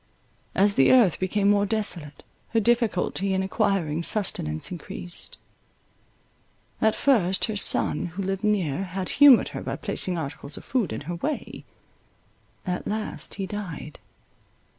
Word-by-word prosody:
As 200 +2 +4
the 135 - +4
earth 235 -10 +5
became 200 +2 0
more 205 0 +3
desolate, 175 -9 -2 0.3
her 225 - +4
difficulty 205 -4 +1
in 190 - 0
acquiring 190 -6 0
sustenance 165 - -1
increased; 175 0 -8 1.4
at 220 0 +3
first, 195 -9 +2
her 220 - -4
son, 200 - +2
who 180 +4 -5
lived 195 +1 -3
near, 190 -7 0
had 185 0 -5
humoured 280 -4 +7
her - - -6
by - - -4
placing 180 -2 -2
articles 140 -1 -6
of - - -11
food 235 - 0
in - - -4
her 170 +4 -5
way: 295 - -4 1.0
at 180 -1 -3
last 215 +1 -4
he 195 - -3
died. 190 -7 -7
195 Hz, 140 wpm, -25 LUFS, 175-215 Hz, 1.4 s, humoured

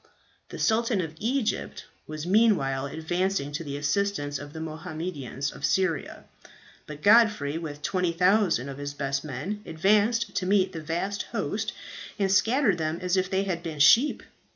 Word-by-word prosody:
"The - - -8
Sultan 225 -1 +1
of 165 -3 -3
Egypt 245 +1 -2 0.2
was 155 0 -6
meanwhile 175 -10 +2
advancing 160 0 -2
to 145 +3 -4
the 140 -2 -5
assistance 145 -1 -1
of 145 0 -9
the 160 - -8
Mohammedans 155 - -5
of - - -13
Syria; 165 0 0 0.6
but 150 0 -9
Godfrey, 205 -9 +4
with 150 -3 -7
20,000 180 - +2
of 140 0 -7
his 145 0 -5
best 140 -1 -2
men, 155 +9 -5
advanced 205 +6 +1
to 185 - -1
meet 195 -1 +3
the 165 -3 -6
vast 175 +6 -2
host, 210 -1 -2 0.5
and 195 -2 +1
scattered 210 -1 +3
them 155 +1 -1
as 180 0 0
if 185 -1 0
they 190 +1 +1
had 180 -4 -3
been 165 -3 -6
sheep. 230 - +5
175 Hz, 155 wpm, -26 LUFS, 150-200 Hz, 0.6 s, sheep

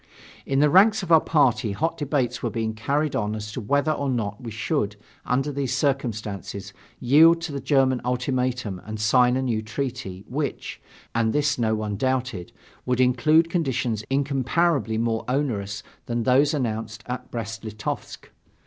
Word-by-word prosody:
In 135 +1 +2
the 150 - +5
ranks 205 +3 +5
of 175 - -5
our 160 -1 +7
party 125 -8 +2
hot 160 +11 -1
debates 135 -5 -1
were 120 - -1
being 110 0 -2
carried 140 +7 -1
on 105 -1 -1
as 110 0 -6
to 125 - -5
whether 145 +8 +1
or 140 -2 -1
not 105 -5 -2
we 120 - -6
should, 110 -1 -1 0.3
under 135 +4 +1
these 135 -2 -2
circumstances, 110 -8 -2 0.3
yield 160 +7 +6
to 165 -2 -4
the 140 - -3
German 130 -3 +2
ultimatum 125 -5 -1
and 110 0 -6
sign 125 +3 +4
a 130 - -1
new 115 -4 0
treaty, 110 -4 -5
which 140 0 -4 0.3
and 115 -1 +1
this 145 -3 +1
no 110 -2 +2
one 105 -2 -3
doubted 130 -7 -2 0.3
would 125 0 -1
include 130 +6 +4
conditions 130 - -1
incomparably 140 -1 +1
more 115 0 0
onerous 110 -7 -2 0.2
than 120 -1 -1
those 135 +4 +4
announced 110 -3 -3
at 125 0 -5
Brest 115 -1 -5
Litovsk. 110 -1 -6
125 Hz, 160 wpm, -24 LUFS, 110-140 Hz, 0.3 s, our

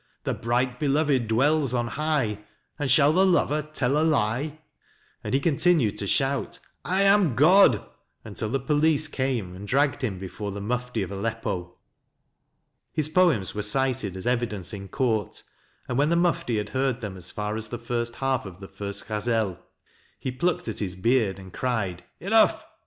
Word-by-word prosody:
The - - -1
bright 125 +2 -1
beloved 140 -4 +1
dwells 135 +3 +2
on 120 -1 -1
high, 140 -7 -1 0.4
And 145 -2 -1
shall 140 +3 +5
the 185 +3 +4
lover 170 -5 +2
tell 150 -2 0
a - - +2
lie? 145 0 0 0.6
and - - -1
he - - +3
continued 150 - +2
to 100 - -2
shout 135 +6 0
" - - -44
I 190 +2 +1
am 195 - +4
God 155 - +5 0.2
" - - -42
until 110 0 -4
the 135 +4 0
police 150 +3 +2
came 130 -10 -2
and 100 +2 -9
dragged 140 +3 +1
him 110 -8 -2
before 100 +2 -6
the 100 - -6
Mufti 125 +1 -2
of 95 - -6
Aleppo. 100 -3 -4 1.1
His 155 -1 0
poems 155 - +3
were 105 - -3
cited 110 -3 0
as 95 - -7
evidence 120 -7 -1
in 100 -1 -7
court, 115 -5 -1 0.4
and 125 +1 -1
when 145 +2 +3
the 170 - +3
Mufti 170 -9 +1
had 105 0 -3
heard 130 -1 -1
them 105 -4 -5
as 90 -1 -7
far 105 0 -3
as 110 0 -4
the 120 - -4
first 120 0 -3
half 135 -5 -1
of 90 -1 -11
the 95 - -9
first 100 +1 -7
Ghazel, 110 -3 -1 0.6
he 130 - -3
plucked 170 +5 -1
at 110 - -3
his 95 -3 -2
beard 110 0 +1
and 95 -1 -12
cried: 105 -9 -2
" - - -48
Enough! 220 +5 +3
125 Hz, 180 wpm, -25 LUFS, 105-145 Hz, 1.1 s, shall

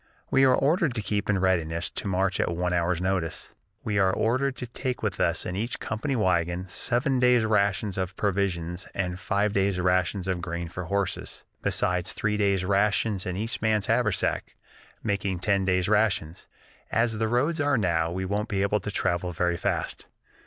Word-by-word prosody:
We 135 0 +5
are 130 -1 +5
ordered 150 -1 +2
to 110 - -1
keep 105 -1 -1
in 105 - +3
readiness 85 -3 +1
to - - -4
march 95 0 0
at - - +1
one 90 +1 -1
hour's 85 0 +1
notice. 90 -3 -2 0.3
We 105 -1 0
are 95 -1 +4
also - - -3
ordered 130 +4 +1
to 125 - -5
take 125 +1 -4
with 100 -4 -2
us 85 -1 +1
in 90 - -3
each 115 +5 -2
company 125 +5 -2
wagon 90 -4 +1
seven 120 +7 0
days' 125 -2 +4
rations 100 -2 +1
of 95 0 -3
provisions 90 -4 -1
and 90 -1 -2
five 100 +1 0
days' 95 -2 +1
rations 90 +1 +1
of 90 -2 -1
grain 85 -1 -4
for 90 +1 -6
horses, 100 +1 -2 0.2
besides 90 0 0
three 105 0 -1
days' 100 -3 +1
rations 100 0 +1
in 90 0 -3
each 115 +3 -3
man's 110 -2 +2
haversack, 115 -4 0 0.5
making 100 -3 -1
ten 100 +1 +1
days' 90 -1 +1
rations. 100 -6 +1 0.4
As 115 -1 +1
the 110 - +1
roads 145 +8 +1
are 145 -2 +2
now, 85 -6 +1
we 95 +2 -3
won't 105 +3 -2
be 100 -2 0
able 100 +1 +1
to 105 - -5
travel 90 -2 -1
very 85 +1 +1
fast. - - -3
100 Hz, 185 wpm, -26 LUFS, 90-110 Hz, 0.5 s, We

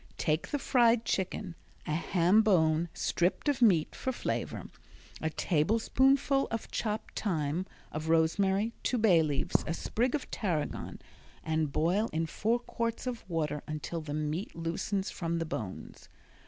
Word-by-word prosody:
Take 155 0 0
the 290 - -1
fried 240 -4 +3
chicken, 190 -1 -2 0.3
a 150 - -2
ham 180 +5 +3
bone 165 -5 +3
stripped 175 - 0
of 285 -3 +1
meat 180 -9 +4
for 260 - -2
flavor, 245 - -3 0.6
a 160 - 0
tablespoonful 250 - +2
of 230 -1 -4
chopped 215 -1 -3
thyme, 165 -2 -1 0.2
of 155 +1 -4
rosemary, 190 +7 +2
two 250 - 0
bay 200 -7 +5
leaves, 150 -3 0
a 165 - -1
sprig 245 - 0
of 290 - -5
tarragon 175 -9 -2 0.4
and 160 -2 0
boil 180 +10 +1
in 160 +1 0
four 220 +8 0
quarts 230 -1 -3
of 250 -2 -4
water 155 -3 -1
until 155 +2 -4
the 150 -1 -5
meat 155 +5 -3
loosens 170 +4 -2
from 170 -2 -2
the 165 - -1
bones. 110 - -6
175 Hz, 145 wpm, -31 LUFS, 160-225 Hz, 0.6 s, bay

